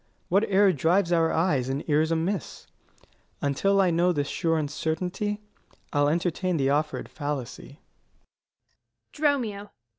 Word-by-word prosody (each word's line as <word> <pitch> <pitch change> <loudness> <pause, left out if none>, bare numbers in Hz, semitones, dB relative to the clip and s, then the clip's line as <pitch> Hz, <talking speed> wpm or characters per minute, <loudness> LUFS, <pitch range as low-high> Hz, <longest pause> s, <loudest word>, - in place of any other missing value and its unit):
What 195 +5 +3
error 195 -1 +4
drives 170 +5 +2
our 165 -1 +3
eyes 150 -7 +1
and 135 +3 -3
ears 155 +1 +2
amiss? 165 +4 -2 0.7
Until 195 +8 +1
I 185 -2 +4
know 175 +2 +3
this 145 -4 -1
sure 165 0 0
uncertainty, 180 +7 -2 0.5
I'll 145 0 +3
entertain 175 +2 0
the 135 -1 +1
offer'd 150 +1 -1
fallacy. 145 0 -6
165 Hz, 115 wpm, -26 LUFS, 145-185 Hz, 0.7 s, error